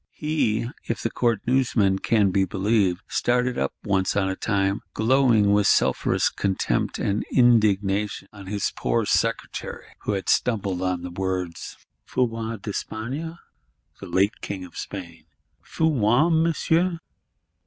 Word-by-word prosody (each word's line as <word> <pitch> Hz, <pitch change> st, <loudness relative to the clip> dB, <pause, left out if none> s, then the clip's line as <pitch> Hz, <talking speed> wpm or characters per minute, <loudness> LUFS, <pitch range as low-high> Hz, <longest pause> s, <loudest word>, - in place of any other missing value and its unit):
He, 145 Hz, -8 st, 0 dB, 0.2 s
if -, -, -3 dB
the -, -, -1 dB
Court 115 Hz, -4 st, +1 dB
Newsmen 115 Hz, -7 st, +2 dB
can 105 Hz, -3 st, +2 dB
be 95 Hz, 0 st, +2 dB
believed, 95 Hz, -1 st, +1 dB
started 125 Hz, 0 st, 0 dB
up -, -, -1 dB
once 95 Hz, -3 st, 0 dB
on 95 Hz, -1 st, +1 dB
a 95 Hz, -, -2 dB
time, 100 Hz, +1 st, 0 dB
glowing 115 Hz, -4 st, +3 dB
with 105 Hz, -1 st, +3 dB
sulphurous -, -, +2 dB
contempt 95 Hz, -11 st, -1 dB
and 100 Hz, +2 st, -1 dB
indignation 105 Hz, -4 st, +2 dB
on 100 Hz, -2 st, -11 dB
his 100 Hz, 0 st, -2 dB
poor -, -, 0 dB
Secretary, -, -, -2 dB
who 105 Hz, -, -2 dB
had 95 Hz, -1 st, -3 dB
stumbled 100 Hz, -6 st, +1 dB
on 90 Hz, -1 st, -1 dB
the 90 Hz, -, -6 dB
words, 90 Hz, -2 st, -4 dB, 0.3 s
feu 125 Hz, -, +1 dB
roi 115 Hz, -1 st, -4 dB
d'Espagne 130 Hz, +11 st, -5 dB, 0.6 s
(the 100 Hz, -, -8 dB
late 95 Hz, +4 st, +1 dB
King 95 Hz, -2 st, -5 dB
of -, -, -15 dB
Spain): 85 Hz, -5 st, -7 dB, 0.4 s
'_Feu 160 Hz, -6 st, 0 dB
roi, 120 Hz, +10 st, +4 dB
Monsieur? 165 Hz, +2 st, +2 dB
105 Hz, 140 wpm, -24 LUFS, 95-120 Hz, 0.6 s, roi